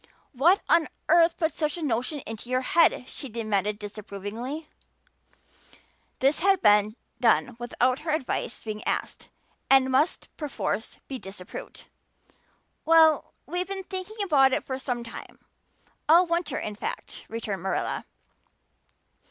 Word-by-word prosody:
"What 325 +9 +4
on 335 -2 +4 0.2
earth 335 +1 +5
put 325 -2 0
such 305 +1 -1
a 335 - -5
notion 260 +2 -1
into 225 +1 -8
your 255 0 +1
head?" 315 -2 +3
she 275 - -7
demanded 210 -2 -1
disapprovingly. 215 +8 -6 1.5
This 275 +3 +3
had 390 +1 +4
been 210 0 +5 0.2
done 245 +1 +3
without 250 +2 +1
her 320 - -6
advice 300 -5 -2
being 215 -1 -5
asked, - - -3 0.4
and 265 -1 +5
must 290 +6 +1
perforce 275 -6 -3
be 265 -2 -5
disapproved. 190 -2 -9 1.0
"Well, 320 -1 +5
we've 360 +1 -3
been 390 -1 -5
thinking 380 +3 -6
about 275 -8 +4
it - - 0
for 260 -1 -4
some 245 -2 -3
time 235 +1 -10 0.7
all 340 +3 +7
winter 340 0 -1
in 210 - -4
fact," 205 - -6
returned 215 -4 -4
Marilla. 190 - -2
260 Hz, 130 wpm, -26 LUFS, 225-325 Hz, 1.5 s, all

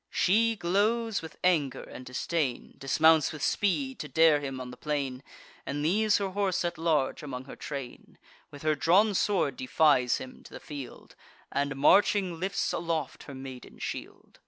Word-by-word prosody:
She 225 +5 +2
glows 215 +4 +1
with 160 - -10
anger 150 -8 +1
and 130 - -10
disdain, 125 +1 -2
Dismounts 155 +2 +4
with 150 -2 -7
speed 260 - 0
to - - -5
dare 160 -2 +5
him 135 -2 -5
on 125 -1 -7
the - - -9
plain, 135 -2 -3 0.4
And 145 +1 -3
leaves 210 +6 +3
her 200 -1 -2
horse 190 -2 0
at 170 - -3
large 155 -5 +1
among 130 -3 -6
her - - -10
train; 135 -4 -8 0.3
With 145 - -12
her 155 0 +3
drawn 185 +8 +3
sword 185 -9 +1
defies 130 -2 +3
him 130 -1 -10
to - - -13
the - - -7
field, 140 -4 -9 0.4
And, 140 0 -1
marching, 185 +4 +3
lifts 190 +1 -1
aloft 165 -4 -3
her 140 - -9
maiden 130 -1 -9
shield. - - -7
155 Hz, 165 wpm, -29 LUFS, 135-190 Hz, 0.4 s, dare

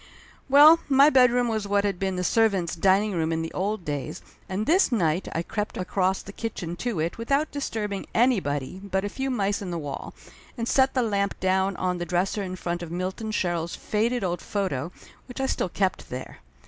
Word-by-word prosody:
Well, 300 +4 +8
my 280 +2 +6
bedroom 250 -2 +4
was 220 -3 -2
what 200 0 +2
had 200 -3 -1
been 190 -1 -1
the 180 - -2
servants' 195 -5 +2
dining 195 +4 +3
room 165 -3 -1
in 165 0 -1
the 165 - -6
old 200 -1 -2
days, 145 +1 -4 0.3
and 195 +3 -2
this 345 +1 +3
night 175 -6 +1
I 165 - -1
crept 210 +4 -4
across 185 +1 0
the 200 - -10
kitchen 180 -7 -5
to 235 -3 -2
it 165 +7 -2
without 275 +6 0
disturbing 210 -8 -3
anybody 185 - +1
but 190 0 -1
a - - -2
few 265 +5 -3
mice 205 -5 0
in 195 - -5
the 170 - -3
wall, 145 -3 -6 0.4
and 230 -1 -2
set 265 +1 +3
the 255 - +3
lamp 200 -3 -1
down 190 +1 +1
on 180 -1 -1
the 175 - -2
dresser 180 +4 0
in 185 -2 -4
front 175 -1 -3
of 170 - -6
Milton 185 +5 -3
Sherrill's 175 -5 -1
faded 230 +3 -1
old 175 -2 -2
photo, 180 -7 -2 0.4
which 250 +1 -8
I 265 - +1
still 225 - -1
kept 190 +1 -1
there. 130 +1 -7
195 Hz, 200 wpm, -25 LUFS, 175-230 Hz, 0.4 s, Well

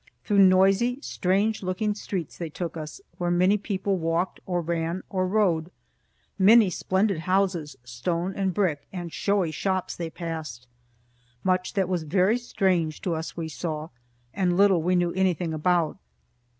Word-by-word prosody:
Through 205 -2 +2
noisy, 195 +6 +5
strange 200 +4 0
looking 190 +3 -1
streets 190 -5 -5
they 170 -2 -5
took 170 +2 -5
us, 155 - -7 0.2
where 175 -1 0
many 180 +3 +4
people 195 -2 -2
walked 165 +3 -1
or 180 -2 0
ran 170 +1 -2
or 185 -1 0
rode. 180 -5 +1 0.7
Many 210 0 +6
splendid 190 +1 0
houses, 185 -4 0
stone 170 +10 -2
and 195 -1 0
brick, 170 -6 -1
and 175 -3 -6
showy 200 -5 +1
shops, 190 +4 -2
they 170 -2 -4
passed. 160 -8 -6 0.8
Much 185 -1 0
that 195 -3 +1
was 180 -2 -1
very 185 +8 +2
strange 180 -9 0
to 175 - 0
us 160 +1 -5
we 165 -1 -3
saw, 155 0 -4 0.4
and 180 -2 +1
little 195 -3 +5
we 180 +3 +1
knew 175 -1 +2
anything 180 -3 0
about. 165 0 +1
180 Hz, 150 wpm, -26 LUFS, 165-195 Hz, 0.8 s, Many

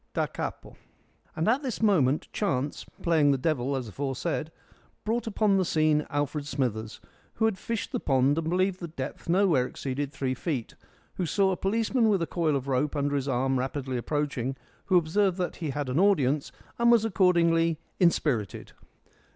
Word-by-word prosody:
Da - - +2
capo. - - -6 0.6
And 160 - -1
at 250 +6 +3
this 260 -6 -4
moment 160 - +2
chance 145 -9 -1 0.2
playing 160 -4 +4
the 140 - +3
devil 140 -2 0
as 130 -3 -3
aforesaid 140 - -3 0.5
brought 225 +2 -1
upon 210 -2 +2
the 190 - +3
scene 155 -3 +2
Alfred 145 0 -2
Smithers, 115 -6 -2 0.4
who 220 - +1
had 220 -4 0
fished 230 +1 -3
the 250 - -1
pond 135 0 +2
and 160 0 -2
believed 185 +1 +1
the 170 - -5
depth 145 0 -7
nowhere 170 -8 +3
exceeded 135 +2 -4
three 130 -2 -2
feet, 130 -3 -3 0.4
who 180 - -1
saw 195 +3 +2
a - - 0
policeman 225 +4 +1
with 195 -5 +2
a - - 0
coil 160 -3 0
of 135 0 -3
rope 140 +3 0
under 145 0 0
his 140 -1 -1
arm 130 0 +1
rapidly 130 0 -3
approaching, 135 0 -2 0.3
who 185 - +4
observed 180 +3 +2
that 180 -2 -3
he 160 -4 -3
had 145 0 -3
an 130 +5 0
audience 150 -8 +2 0.3
and 235 0 +5
was 230 -2 +5
accordingly 170 -4 +3 0.2
inspirited. 145 - +1
155 Hz, 175 wpm, -27 LUFS, 135-190 Hz, 0.6 s, and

